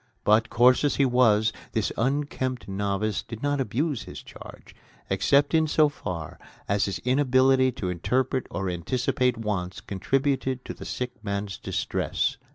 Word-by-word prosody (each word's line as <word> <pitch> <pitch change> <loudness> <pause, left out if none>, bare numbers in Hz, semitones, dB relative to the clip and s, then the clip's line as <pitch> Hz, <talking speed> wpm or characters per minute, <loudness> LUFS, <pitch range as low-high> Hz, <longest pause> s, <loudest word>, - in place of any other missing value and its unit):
But 110 +1 +3
coarse 125 +3 +5
as 145 - +2
he 140 - +3
was, 115 -4 +3 0.2
this - - 0
unkempt 130 0 -1
novice 100 +1 -1
did 115 +1 -9
not 145 -1 +1
abuse 135 +3 -1
his - - -9
charge - - -13 0.4
except 140 0 +3
in 160 -1 +4
so 155 0 +4
far 85 - -6 0.3
as 100 0 +2
his 100 -2 -3
inability 130 0 +4
to 95 - -4
interpret 130 +9 -1
or 95 -1 -3
anticipate 125 +7 0
wants 95 -5 -3
contributed 130 +5 -1
to - - -5
the - - -10
sick 125 -3 -5
man's 100 -2 -3
distress. - - -1
125 Hz, 150 wpm, -26 LUFS, 100-135 Hz, 0.4 s, coarse